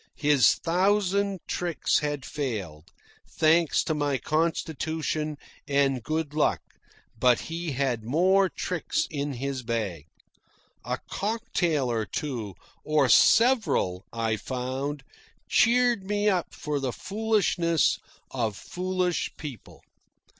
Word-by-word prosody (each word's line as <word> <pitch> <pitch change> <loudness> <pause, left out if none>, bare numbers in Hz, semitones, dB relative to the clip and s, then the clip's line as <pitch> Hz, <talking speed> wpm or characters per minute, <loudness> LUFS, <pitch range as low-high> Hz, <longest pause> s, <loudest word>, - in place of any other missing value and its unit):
His 145 -6 +4
thousand 195 +2 +1
tricks 170 -5 0
had 145 -3 -3
failed, 100 - -5 0.4
thanks 160 0 +3
to 160 - -1
my 145 -2 0
constitution 155 -1 -1 0.3
and 140 -2 +2
good 155 +3 -2
luck, 155 - +2 0.6
but 125 -1 +4
he 165 -2 -4
had 125 -4 -1
more 185 - +3
tricks 180 -2 -2
in 145 -1 -2
his 135 +1 -3
bag. 110 - -3 0.8
A - - -2
cocktail 190 - -1
or 110 -3 -1
two, 115 -5 -4 0.3
or 150 -4 +2
several, 180 - +4
I 115 -1 -1
found, 130 +4 -4 0.4
cheered 240 -3 +3
me 205 +1 0
up 185 -4 0
for 150 -1 -2
the 135 -2 -2
foolishness 195 - +1 0.3
of 115 -5 -1
foolish 180 -1 -2
people. 135 -9 -9
150 Hz, 110 wpm, -27 LUFS, 130-180 Hz, 0.8 s, His